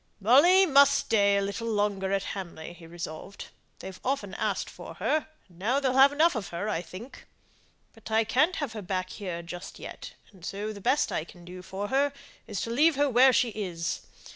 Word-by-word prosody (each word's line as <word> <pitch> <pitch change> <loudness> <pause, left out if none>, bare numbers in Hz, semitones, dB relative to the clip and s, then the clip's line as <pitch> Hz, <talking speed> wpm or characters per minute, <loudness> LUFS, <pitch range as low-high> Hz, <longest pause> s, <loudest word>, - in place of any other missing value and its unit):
"Molly 295 - +6
must 280 -4 +6
stay 200 -2 +2
a 200 - +1
little 200 +3 -4
longer 205 -3 0
at 195 -1 0
Hamley," 170 -4 -7
he 170 -1 -14
resolved. 170 +3 -8 0.3
"They've 190 0 -9
often 250 -8 -2
asked - - -2
for - - -10
her, 310 0 0 0.2
and 175 -2 -21
now 240 +8 +1
they'll 265 -2 0
have 270 +1 +7
enough 320 +4 +3
of 220 -6 -4
her, 175 +5 -4
I 200 -6 -1
think. 185 +9 -11 0.7
But 225 -1 -12
I 220 +1 +3
can't 285 - +2
have 285 -7 -3
her 215 - -6
back 185 -1 -3
here 175 -4 -5
just 175 +2 -8
yet; - - -9 0.2
and 190 -5 -19
so 205 +4 -4
the 200 - -10
best 265 +8 +1
I - - -1
can 175 +1 -15
do 180 +1 -9
for 195 +2 -5
her 280 +1 +2 0.3
is 210 -4 -4
to 230 - -3
leave 300 +6 +4
her 285 0 +2
where 255 +2 +6
she 245 -1 +2
is. 180 -6 -4
205 Hz, 205 wpm, -28 LUFS, 185-265 Hz, 0.7 s, have